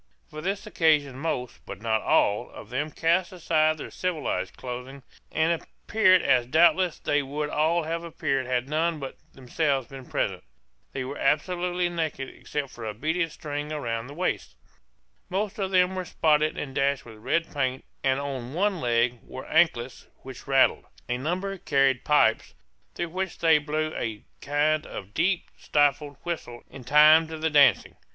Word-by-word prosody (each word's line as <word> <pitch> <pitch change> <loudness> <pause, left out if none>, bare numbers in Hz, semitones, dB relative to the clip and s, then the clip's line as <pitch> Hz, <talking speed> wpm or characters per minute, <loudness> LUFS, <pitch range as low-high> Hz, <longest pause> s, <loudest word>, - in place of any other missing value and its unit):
For 155 0 -7
this 195 +5 -3
occasion 150 -9 +2
most, 135 -6 -3
but 95 - -7
not 110 0 0
all, 105 +4 +2
of 110 - -12
them 145 +5 -1
cast 170 +4 +1
aside 155 -3 +1
their - - -8
civilized 180 -5 -3
clothing, 125 +2 -7 0.3
and 160 +1 +1
appeared 185 -4 +2
as 125 -2 +3
doubtless 170 +4 +4
they 145 0 0
would 145 +2 -4
all 160 +3 +2
have 165 +2 -3
appeared 135 -6 -2
had 125 0 -1
none 160 +2 0
but 135 -2 -7 0.2
themselves 135 0 -1
been 135 -2 -10
present. - - -2 0.5
They 135 - -4
were 135 +3 -6
absolutely 175 +4 +1
naked 160 -6 -3
except 145 -3 -5
for 120 - -10
a 110 -1 -4
beaded 160 +7 -1
string 150 -1 -5
round 120 -5 -3
the 145 - -10
waist. 165 - -2 0.7
Most 200 +2 -2
of 195 -1 -1
them 185 0 +3
were 185 -1 -3
spotted 155 -2 +2
and 135 -2 -5
dashed 140 0 0
with 110 -2 -12
red 150 +9 -1
paint, 130 -2 -1 0.2
and 135 0 +2
on 135 -2 -5
one 195 -1 +1
leg 120 0 +1
wore 130 - -9
anklets 145 -7 +1 0.2
which 130 0 -10
rattled. 135 -1 +3 0.2
A 125 0 -1
number 185 +7 -3
carried 135 -4 +2
pipes 130 -7 +2 0.4
through 170 - -3
which 185 +1 -4
they 160 -2 +4
blew 155 +1 -2
a 110 -3 -4 0.2
kind 150 +2 +1
of 95 +2 -8
deep 175 - 0
stifled 145 -1 +1
whistle 155 -9 -5
in 130 - -10
time 155 +4 +7
to 160 0 -6
the 160 0 -1
dancing. 145 -3 +4
150 Hz, 165 wpm, -26 LUFS, 130-165 Hz, 0.7 s, time